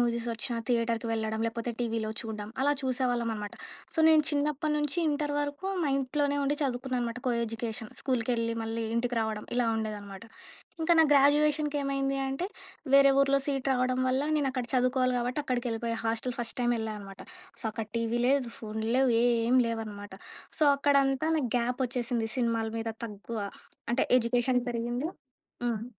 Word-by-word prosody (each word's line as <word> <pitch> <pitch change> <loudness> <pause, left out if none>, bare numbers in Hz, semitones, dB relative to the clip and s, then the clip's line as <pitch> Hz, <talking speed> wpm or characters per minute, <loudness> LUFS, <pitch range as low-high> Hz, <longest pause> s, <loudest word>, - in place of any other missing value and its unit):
Movies 235 -1 0
ఒచ్చినా 235 +1 -3
థియేటర్‌కి 230 -1 0
వెళ్ళడం. 220 0 -1
లేకపోతే 230 +1 -3
టీవీలో 225 -2 -1
చూడడం. 215 -2 -6
అలా 290 +1 +4
చూసేవాళ్ళం 245 -3 0
అనమాట. 210 -1 -6 0.4
సో - - -5
నేను 315 -1 +6
చిన్నప్పటి 300 +1 0
నుంచి 295 +2 -1
ఇంటర్ 295 0 -1
వరకు 290 +5 -3 0.2
మా - - +1
ఇంట్లోనే 285 +2 0
ఉండి 285 +1 +1
చదువుకున్నాను 255 -1 -1
అనమాట. 230 +1 -4
కోఎడ్యుకేషన్ 230 -1 -2
స్కూల్‌కేళ్ళి, 230 -3 0
మళ్ళీ 225 +1 -3
ఇంటికి 240 +1 0
రావడం 220 -1 -3
ఇలా 245 -2 +2
ఉండేదన్నమాట. 205 -2 -5 0.6
ఇంకా 330 +2 +4
నా - - +9
గ్రాడ్యుయేషన్‌‌‌కేమైంది 285 -1 +2
అంటే 270 +7 -2 0.5
వేరే 275 0 +8
ఊరులో 275 0 +4
సీట్ 275 -2 -1
రావడం 255 0 +1
వల్ల 260 +1 +2 0.2
నేను 285 -2 +1
అక్కడ 255 -2 -2
చదువుకోవాలి 255 0 +2
కాబట్టి, 245 +4 -2
అక్కడికి 250 -2 -1
వెళ్ళిపోయ. 230 0 -2
హాస్టల్ 230 +2 -1
ఫస్ట్ 230 - -4
టైమ్ 240 0 +2
వెళ్ళా 220 -1 -3
అనమాట. 195 -1 -11 0.4
సో - - -10
అక్కడ 225 0 -4
టీవీ 230 +1 0
లేదు 270 -2 +2
ఫోన్లు 220 0 -4
లేవు 265 -1 +4
ఏం 240 +1 +3
లేవన్నమాట. 215 -3 -5 0.5
సో 310 - +4
అక్కడంతా 275 0 +2
నాకు 290 -6 0
గ్యాప్ 245 +1 0
వచ్చేసింది 240 -2 -1
సినిమాల 230 -2 0
మీద 225 0 -3 0.2
తక్కువ. 220 +1 -6 0.5
అంటే 240 +2 +2
ఎడ్యుకేషన్ 245 +1 +2
పెరిగింది 240 +3 -2 0.6
హ్మ్. 230 -2 -1
245 Hz, 155 wpm, -29 LUFS, 230-275 Hz, 0.6 s, నా